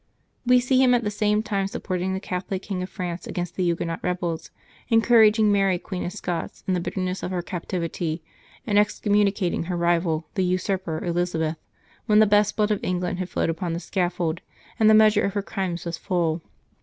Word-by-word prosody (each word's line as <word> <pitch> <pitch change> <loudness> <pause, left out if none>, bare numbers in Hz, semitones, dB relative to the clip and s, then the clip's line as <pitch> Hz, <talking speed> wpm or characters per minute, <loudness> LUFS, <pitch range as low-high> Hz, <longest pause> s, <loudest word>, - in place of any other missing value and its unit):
We 250 0 +6
see 255 +1 +2
him 250 -1 +5
at 240 - +1
the 210 - -1
same 210 +1 +1
time 200 -3 -1
supporting 190 -1 -3
the - - -2
Catholic 185 0 -4
King 190 -3 -3
of 185 - -4
France 175 -3 -5
against 175 -2 -4
the - - -2
Huguenot 170 -1 -1
rebels, 175 -2 -2 0.4
encouraging 225 -2 +5
Mary 195 -2 +3
Queen 180 +1 -5
of 175 - -3
Scots, 175 -2 -5
in 190 - +1
the 180 - +1
bitterness 185 +1 -3
of - - -3
her 180 -2 -2
captivity, 170 -2 -3 0.4
and 205 -3 +3
ex 210 0 +1
communicating 200 -4 +1
her 180 0 -2
rival 170 -2 +1
the 190 - 0
usurper 185 -2 -1
Elizabeth, 170 -2 -1 0.5
when 210 -2 +4
the 215 - +7
best 205 0 +3
blood 210 0 +2
of 210 - -1
England 180 0 -1
had 185 -1 -3
flowed 165 - 0
upon 165 +1 -3
the 170 - -2
scaffold, 175 -2 -1 0.4
and 220 -1 +6
the 220 - +7
measure 215 -1 +5
of 200 - 0
her 200 - 0
crimes 185 -4 -3
was 170 -1 -4
full. 170 -4 0
185 Hz, 195 wpm, -24 LUFS, 175-205 Hz, 0.5 s, the